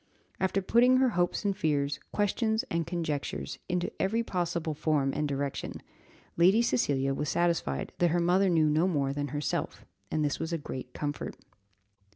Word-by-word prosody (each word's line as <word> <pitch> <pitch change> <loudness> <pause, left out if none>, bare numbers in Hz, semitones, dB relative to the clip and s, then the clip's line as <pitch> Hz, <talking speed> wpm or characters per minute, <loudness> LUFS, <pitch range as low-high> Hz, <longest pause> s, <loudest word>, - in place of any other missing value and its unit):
After 190 +1 +1
putting 245 +5 +5
her 260 0 +4
hopes 175 0 0
and 200 -1 +1
fears, 145 -6 0
questions 220 +2 +1
and 170 0 0
conjectures, 150 - -3
into 180 0 -1
every 225 +4 +1
possible 170 -5 -2
form 145 -2 +1
and 150 - 0
direction, 140 -1 -3 0.6
Lady 190 +7 +5
Cecilia 135 - +1
was 150 +1 -2
satisfied 170 - 0
that 175 - +4
her 175 +2 +2
mother 185 +3 +3
knew 160 -3 +4
no 160 +4 +3
more 140 -6 0
than 145 0 -2
herself, 145 +2 -3 0.2
and 155 -1 0
this 145 - -1
was 160 - -3
a 165 - 0
great 130 -4 -7
comfort. 145 -1 -4
165 Hz, 165 wpm, -29 LUFS, 145-190 Hz, 0.6 s, putting